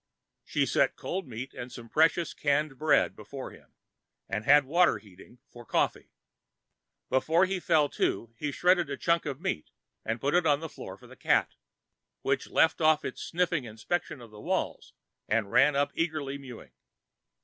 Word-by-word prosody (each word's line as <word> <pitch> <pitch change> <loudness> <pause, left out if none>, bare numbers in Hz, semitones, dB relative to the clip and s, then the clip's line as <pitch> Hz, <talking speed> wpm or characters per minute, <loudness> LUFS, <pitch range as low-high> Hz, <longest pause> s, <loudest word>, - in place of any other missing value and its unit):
She - - 0
set - - +2
cold 185 -3 -4
meat 125 +2 -7
and 125 +1 -7
some 120 -1 -10
precious 160 +5 +2
canned 145 -1 0
bread 155 0 +3
before - - -8
him - - -18 0.5
and 105 0 -3
had 145 0 +6
water 170 +6 +3
heating 100 +4 -16
for 120 - -13
coffee. - - -1 1.0
Before 160 +7 +3
he 190 0 -2
fell 160 -4 +3
to, 115 0 -1
he 150 -1 -2
shredded 175 0 +2
a 140 - -3
chunk 170 -2 +1
of 140 -1 -4
meat 170 - -3 0.3
and 115 +1 -2
put 140 +4 0
it 175 -2 +3
on 145 -1 +3
the 160 - -5
floor - - -9
for - - -17
the - - -14
cat, - - +1 0.7
which - - 0
left 160 +1 +3
off 155 -1 +4
its 130 - -5
sniffing 170 -5 -1
inspection 120 +6 -4
of 115 -2 -13
the 105 -1 -12
walls - - -2 0.4
and 105 -2 0
ran 145 +1 +5
up 140 +1 +1
eagerly 155 -4 -2
mewing. 130 -4 -11
145 Hz, 170 wpm, -29 LUFS, 125-165 Hz, 1.0 s, had